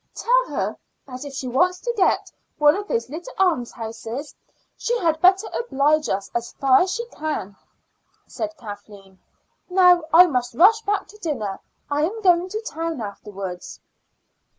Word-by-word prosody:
"Tell -, -, +2 dB
her -, -, -2 dB, 0.3 s
that 255 Hz, -1 st, -8 dB
if 285 Hz, -, -7 dB
she 265 Hz, -1 st, -5 dB
wants 360 Hz, +9 st, +2 dB
to 475 Hz, -, -2 dB
get 390 Hz, -, +1 dB, 0.3 s
one 295 Hz, 0 st, +5 dB
of 405 Hz, +1 st, -5 dB
the 485 Hz, -, -1 dB
little 345 Hz, -, -8 dB
almshouses 245 Hz, -5 st, -2 dB, 0.4 s
she 480 Hz, +1 st, -1 dB
had 325 Hz, -6 st, 0 dB
better 380 Hz, +3 st, +5 dB
oblige 305 Hz, -, +1 dB
us 195 Hz, 0 st, -2 dB
as 235 Hz, 0 st, -3 dB
far 265 Hz, -1 st, +4 dB
as 370 Hz, +1 st, +1 dB
she 470 Hz, -, -3 dB
can," 300 Hz, -, -4 dB, 0.7 s
said. 320 Hz, 0 st, -5 dB
Kathleen. 205 Hz, -4 st, -11 dB, 0.5 s
"Now 360 Hz, -2 st, +5 dB
I 345 Hz, +4 st, +9 dB
must 250 Hz, -7 st, -2 dB
rush 430 Hz, -, +6 dB
back 410 Hz, -2 st, -1 dB
to 425 Hz, -, -15 dB
dinner. 255 Hz, -, -3 dB, 0.3 s
I 290 Hz, +1 st, +1 dB
am 385 Hz, +9 st, -1 dB
going 355 Hz, -1 st, +4 dB
to 430 Hz, +3 st, -4 dB
town 330 Hz, -, -4 dB
afterwards." 200 Hz, -3 st, -7 dB
310 Hz, 155 wpm, -22 LUFS, 240-370 Hz, 0.7 s, I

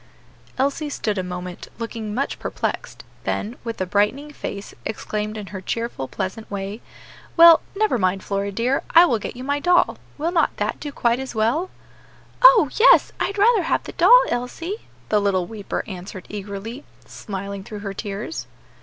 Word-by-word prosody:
Elsie 280 Hz, +3 st, 0 dB
stood 210 Hz, -7 st, -2 dB
a -, -, -1 dB
moment 180 Hz, 0 st, -6 dB
looking 225 Hz, -2 st, -5 dB
much 275 Hz, +3 st, -2 dB
perplexed; -, -, -4 dB, 0.2 s
then, 220 Hz, +4 st, -2 dB
with 230 Hz, -1 st, -5 dB
a 185 Hz, -, 0 dB
brightening 210 Hz, +11 st, 0 dB
face, 200 Hz, -6 st, -6 dB
exclaimed 215 Hz, 0 st, -3 dB
in 210 Hz, -, -6 dB
her 190 Hz, -, -5 dB
cheerful, 230 Hz, -, -3 dB
pleasant 190 Hz, +9 st, -5 dB
way, 200 Hz, +2 st, -5 dB, 0.6 s
"Well, 335 Hz, -1 st, +9 dB
never 420 Hz, -, +1 dB
mind, 185 Hz, 0 st, +1 dB
Flora, 200 Hz, 0 st, -2 dB
dear, 240 Hz, +7 st, 0 dB
I 340 Hz, +2 st, +10 dB
will 235 Hz, -10 st, +1 dB
get 210 Hz, -, -6 dB
you 250 Hz, -, -7 dB
my 285 Hz, +2 st, 0 dB
doll. 355 Hz, +4 st, +3 dB, 0.2 s
Will 320 Hz, +3 st, -1 dB
not 340 Hz, -2 st, +1 dB
that -, -, -2 dB
do 295 Hz, -, -5 dB
quite 235 Hz, -2 st, +1 dB
as 265 Hz, -2 st, -6 dB
well?" 240 Hz, +12 st, +1 dB, 0.7 s
"Oh! -, -, +8 dB
yes, 485 Hz, -, +7 dB
I'd 400 Hz, -, -1 dB
rather 430 Hz, +1 st, +5 dB
have 330 Hz, -, 0 dB
the -, -, -7 dB
doll, -, -, +7 dB
Elsie," 330 Hz, -, -4 dB, 0.2 s
the 210 Hz, -1 st, +3 dB
little 190 Hz, -3 st, +1 dB
weeper 210 Hz, 0 st, -4 dB
answered 185 Hz, -1 st, -8 dB
eagerly, 210 Hz, +6 st, -6 dB, 0.2 s
smiling 200 Hz, -1 st, -6 dB
through 210 Hz, +1 st, -8 dB
her 200 Hz, -1 st, -4 dB
tears. 205 Hz, -, -5 dB
225 Hz, 170 wpm, -22 LUFS, 200-290 Hz, 0.7 s, I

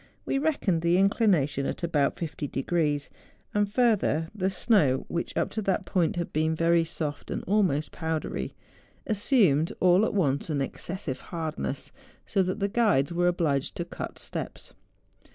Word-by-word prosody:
We 275 Hz, -, 0 dB
reckoned 275 Hz, -, +1 dB
the 170 Hz, +1 st, +3 dB
inclination 185 Hz, -, +2 dB
at -, -, -5 dB
about 150 Hz, -4 st, +1 dB
50 155 Hz, -3 st, -4 dB
de¬ 135 Hz, -1 st, -4 dB
grees. 150 Hz, -4 st, 0 dB, 0.4 s
And 205 Hz, 0 st, +2 dB
furtlier, 210 Hz, -, +2 dB
the 190 Hz, -3 st, 0 dB
snow 180 Hz, -, +2 dB
which, 170 Hz, -, -3 dB
up -, -, 0 dB
to 220 Hz, -, -2 dB
that 195 Hz, -3 st, 0 dB
point, 175 Hz, -4 st, +1 dB
had 170 Hz, -1 st, -3 dB
been 155 Hz, +1 st, +1 dB
very 170 Hz, +1 st, +3 dB
soft 155 Hz, -3 st, -4 dB
and -, -, -3 dB
almost 185 Hz, -7 st, +1 dB
powdery, 160 Hz, -1 st, -3 dB, 0.5 s
as¬ 215 Hz, -, +1 dB
sumed 190 Hz, -, +3 dB
all 180 Hz, +2 st, +5 dB
at 220 Hz, -, 0 dB
once 145 Hz, -6 st, +1 dB
an 150 Hz, -2 st, 0 dB
excessive 150 Hz, +1 st, -4 dB
hardness, 160 Hz, -5 st, -3 dB, 0.3 s
so 195 Hz, -, +1 dB
that 185 Hz, +3 st, -1 dB
the 200 Hz, -, +1 dB
guides 200 Hz, -, +2 dB
were 175 Hz, +1 st, +2 dB
obliged 160 Hz, -6 st, 0 dB
to -, -, -3 dB
cut -, -, -7 dB
steps. -, -, -5 dB
170 Hz, 165 wpm, -27 LUFS, 150-195 Hz, 0.5 s, all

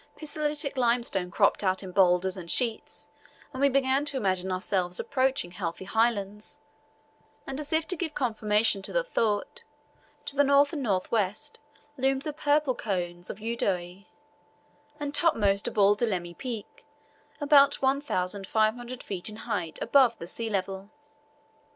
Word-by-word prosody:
Pisolitic 295 Hz, -2 st, -2 dB
limestone 235 Hz, -7 st, +1 dB
cropped 175 Hz, -, +2 dB
out 190 Hz, 0 st, +1 dB
in 185 Hz, -, -7 dB
boulders 185 Hz, 0 st, +3 dB
and 175 Hz, -3 st, -9 dB
sheets, 230 Hz, 0 st, 0 dB, 0.5 s
and 260 Hz, -, -5 dB
we 280 Hz, -, +5 dB
began 270 Hz, +1 st, +2 dB
to 285 Hz, -2 st, -2 dB
imagine 190 Hz, -4 st, 0 dB
ourselves 185 Hz, -1 st, -1 dB
approaching 260 Hz, -9 st, 0 dB
healthy 180 Hz, +1 st, -5 dB
highlands, 210 Hz, -1 st, -1 dB, 0.9 s
and 270 Hz, +1 st, -5 dB
as 295 Hz, -1 st, -5 dB
if 320 Hz, 0 st, +1 dB
to 365 Hz, -, 0 dB
give 320 Hz, -3 st, -4 dB
confirmation 215 Hz, -4 st, +1 dB
to -, -, -6 dB
the -, -, +1 dB
thought, 230 Hz, -, -1 dB, 0.6 s
to 280 Hz, -, -5 dB
the 285 Hz, -, +5 dB
north 280 Hz, +2 st, +4 dB
and 300 Hz, -, -3 dB
north 195 Hz, -7 st, -1 dB
west 220 Hz, +7 st, -1 dB, 0.4 s
loomed 270 Hz, +1 st, +1 dB
the 305 Hz, -, -4 dB
purple 295 Hz, -2 st, +2 dB
cones 175 Hz, -6 st, -4 dB
of -, -, -6 dB
Udoe, 195 Hz, -4 st, -2 dB, 0.9 s
and 290 Hz, -1 st, -4 dB
topmost 205 Hz, -12 st, +2 dB
of -, -, -5 dB
all 205 Hz, 0 st, +5 dB
Dilima 185 Hz, -6 st, -2 dB
Peak, 245 Hz, -6 st, -7 dB, 0.6 s
about 285 Hz, -1 st, +5 dB
1,500 235 Hz, -2 st, -1 dB
feet 190 Hz, 0 st, -3 dB
in 215 Hz, -, -7 dB
height 165 Hz, -6 st, -4 dB
above 255 Hz, -5 st, +4 dB
the -, -, -7 dB
sea 225 Hz, +6 st, -4 dB
level. 195 Hz, 0 st, -3 dB
225 Hz, 145 wpm, -27 LUFS, 190-275 Hz, 0.9 s, we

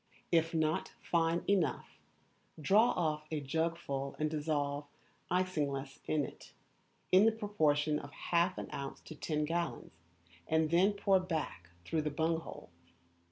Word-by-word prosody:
If 165 Hz, -1 st, +3 dB
not 155 Hz, -1 st, 0 dB
fine 170 Hz, 0 st, +1 dB
enough, 195 Hz, -4 st, 0 dB, 0.6 s
draw 205 Hz, -, +5 dB
off 155 Hz, -3 st, -1 dB
a 155 Hz, -, -1 dB
jugful 140 Hz, -2 st, -2 dB
and 155 Hz, 0 st, 0 dB
dissolve 145 Hz, -2 st, -1 dB, 0.4 s
isinglass 145 Hz, -7 st, -1 dB
in 150 Hz, -2 st, +1 dB
it, -, -, -12 dB, 0.6 s
in 190 Hz, +4 st, +7 dB
the -, -, +6 dB
proportion 155 Hz, -9 st, +1 dB
of 140 Hz, -, -10 dB
half 175 Hz, +5 st, +1 dB
an -, -, -4 dB
ounce 140 Hz, -1 st, -5 dB
to -, -, -10 dB
ten 150 Hz, 0 st, -1 dB
gallons, 170 Hz, -, -3 dB, 0.5 s
and 160 Hz, 0 st, +2 dB
then 185 Hz, +5 st, +4 dB
pour 200 Hz, -1 st, +3 dB
back 155 Hz, -, -4 dB, 0.2 s
through 160 Hz, -1 st, 0 dB
the 150 Hz, -, -1 dB
bung 160 Hz, +3 st, 0 dB
hole. 165 Hz, -, -10 dB
160 Hz, 140 wpm, -34 LUFS, 150-175 Hz, 0.6 s, in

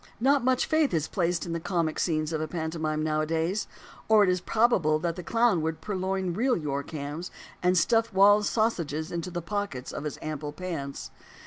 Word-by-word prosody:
Not 270 Hz, +2 st, +3 dB
much 255 Hz, 0 st, +2 dB
faith 310 Hz, -, +2 dB
is 160 Hz, -1 st, 0 dB
placed 175 Hz, -3 st, -1 dB
in 170 Hz, -, -4 dB
the 170 Hz, -, -2 dB
comic 165 Hz, -3 st, -1 dB
scenes 155 Hz, -2 st, 0 dB
of 155 Hz, -, -1 dB
a 155 Hz, -, -2 dB
pantomime 160 Hz, -1 st, -2 dB
nowadays; 160 Hz, +5 st, 0 dB, 0.4 s
or 220 Hz, -1 st, +6 dB
it 185 Hz, -, +3 dB
is 180 Hz, -1 st, -1 dB
probable 205 Hz, -10 st, +2 dB
that 170 Hz, +1 st, -2 dB
the 180 Hz, -, -6 dB
clown 230 Hz, -1 st, +2 dB
would 160 Hz, 0 st, -2 dB
purloin 190 Hz, -2 st, -2 dB
real 245 Hz, +6 st, +1 dB
York 140 Hz, -3 st, -3 dB
hams, 150 Hz, +3 st, -5 dB, 0.3 s
and 180 Hz, +1 st, +3 dB
stuff 225 Hz, +7 st, +3 dB
Wall's 205 Hz, +2 st, +5 dB
sausages 170 Hz, -8 st, -1 dB
into 170 Hz, +1 st, -3 dB
the 175 Hz, -1 st, -5 dB
pockets 200 Hz, -9 st, -4 dB
of 150 Hz, -, -6 dB
his 150 Hz, -, -4 dB
ample 150 Hz, -1 st, -5 dB
pants. 150 Hz, -5 st, -5 dB
170 Hz, 190 wpm, -27 LUFS, 155-205 Hz, 0.4 s, or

